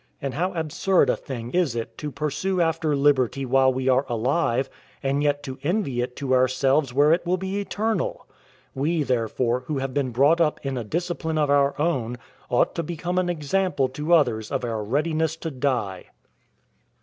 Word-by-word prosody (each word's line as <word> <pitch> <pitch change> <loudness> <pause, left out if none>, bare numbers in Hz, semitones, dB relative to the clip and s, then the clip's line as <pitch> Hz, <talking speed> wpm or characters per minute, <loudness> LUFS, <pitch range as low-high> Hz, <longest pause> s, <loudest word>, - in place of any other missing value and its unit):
And 135 -2 -4
how 180 +7 -1
absurd 170 +3 +2
a - - 0
thing 120 -3 -7
is 170 -8 +1
it 115 -1 -4
to 150 - -4
pursue 155 +6 -2
after 165 -2 +1
liberty 135 -2 +2
while 130 +1 +4
we 130 0 -3
are 130 +1 +4
alive, 125 +2 +1 0.4
and 135 +1 +1
yet 145 -1 +1
to 130 -1 -7
envy 150 - 0
it 125 0 -4
to 135 -2 -1
ourselves 130 +2 +2
where 145 +4 +4
it 170 - +1
will 180 +1 0
be 190 +2 -3
eternal! 210 -1 -2 0.5
We, 155 +4 0
therefore, 120 -1 0
who 150 - -2
have 135 -1 -3
been 140 -3 0
brought 140 +8 +3
up 155 -2 +2
in 135 -1 -2
a 120 - -3
discipline 160 +4 -2
of 150 -2 +2
our 140 0 +2
own, 130 -7 0 0.3
ought 120 - +2
to 170 - -2
become 175 +2 -2
an 180 -1 0
example 170 -2 0
to 150 +6 +2
others 110 -9 +1
of 135 -3 -1
our 110 -2 -2
readiness 155 +6 0
to 165 0 -5
die. 125 -9 -2
145 Hz, 185 wpm, -24 LUFS, 130-165 Hz, 0.5 s, while